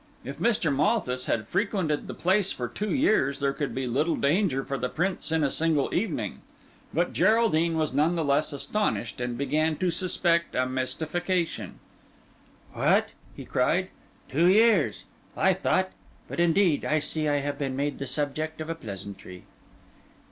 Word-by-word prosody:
If -, -, -7 dB
Mr. 195 Hz, -11 st, +1 dB
Malthus 140 Hz, -, 0 dB
had 110 Hz, -2 st, -1 dB
frequented 185 Hz, -, -1 dB
the -, -, -6 dB
place 190 Hz, +2 st, +2 dB
for 120 Hz, -, -3 dB
two 205 Hz, -, -4 dB
years 215 Hz, -, +2 dB
there 140 Hz, -1 st, +1 dB
could 145 Hz, 0 st, -3 dB
be 130 Hz, 0 st, -2 dB
little 145 Hz, +7 st, +1 dB
danger 145 Hz, -2 st, +1 dB
for 140 Hz, -, -3 dB
the 125 Hz, -2 st, -2 dB
Prince 180 Hz, -1 st, -2 dB
in 160 Hz, -1 st, +2 dB
a 140 Hz, -, +1 dB
single 160 Hz, -3 st, 0 dB
evening. 215 Hz, +6 st, -2 dB, 0.5 s
But -, -, 0 dB
Geraldine 170 Hz, -8 st, +3 dB
was 155 Hz, -4 st, 0 dB
none 155 Hz, +5 st, +2 dB
the 165 Hz, -2 st, -1 dB
less 145 Hz, +3 st, +2 dB
astonished, 145 Hz, -, -2 dB
and 120 Hz, -1 st, -3 dB
began 155 Hz, +4 st, +1 dB
to 180 Hz, +2 st, 0 dB
suspect 170 Hz, -1 st, 0 dB
a 130 Hz, -, +2 dB
mystification. 160 Hz, +7 st, -2 dB, 1.0 s
"What!" -, -, +2 dB, 0.4 s
cried -, -, +1 dB, 0.4 s
he, -, -, -19 dB
"two 165 Hz, +5 st, +4 dB
years! 220 Hz, +4 st, +4 dB, 0.3 s
I 190 Hz, -, +4 dB
thought—but 185 Hz, -1 st, -3 dB
indeed 175 Hz, -1 st, +3 dB
I 155 Hz, -, +1 dB
see 155 Hz, 0 st, -1 dB
I 145 Hz, -1 st, +1 dB
have 145 Hz, 0 st, -4 dB
been 135 Hz, -2 st, -2 dB
made 145 Hz, +1 st, -2 dB
the 140 Hz, -, -4 dB
subject 150 Hz, +4 st, -2 dB
of 155 Hz, +1 st, -4 dB
a -, -, 0 dB
pleasantry." 100 Hz, -, -9 dB
155 Hz, 160 wpm, -27 LUFS, 140-180 Hz, 1.0 s, two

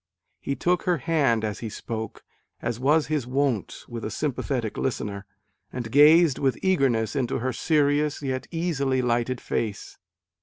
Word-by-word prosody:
He 140 Hz, -, -3 dB
took 180 Hz, +3 st, +1 dB
her 175 Hz, -, +3 dB
hand 140 Hz, -8 st, +1 dB
as 105 Hz, -2 st, -3 dB
he 115 Hz, -, -5 dB
spoke, 110 Hz, 0 st, -6 dB, 0.4 s
as 120 Hz, 0 st, -3 dB
was 150 Hz, +4 st, +3 dB
his 150 Hz, -5 st, -2 dB
wont 130 Hz, -5 st, -1 dB
with 115 Hz, -2 st, -6 dB
a -, -, -2 dB
sympathetic 125 Hz, -3 st, -2 dB
listener, 100 Hz, -6 st, -3 dB, 0.4 s
and 120 Hz, -3 st, -5 dB
gazed 150 Hz, +2 st, +6 dB
with 135 Hz, -2 st, +1 dB
eagerness 135 Hz, -, +2 dB
into 130 Hz, -4 st, 0 dB
her 130 Hz, +2 st, -2 dB
serious 150 Hz, +1 st, +1 dB
yet 130 Hz, -1 st, -3 dB
easily 140 Hz, -6 st, 0 dB
lighted 120 Hz, +1 st, 0 dB
face. 105 Hz, -3 st, -4 dB
130 Hz, 150 wpm, -25 LUFS, 115-150 Hz, 0.4 s, gazed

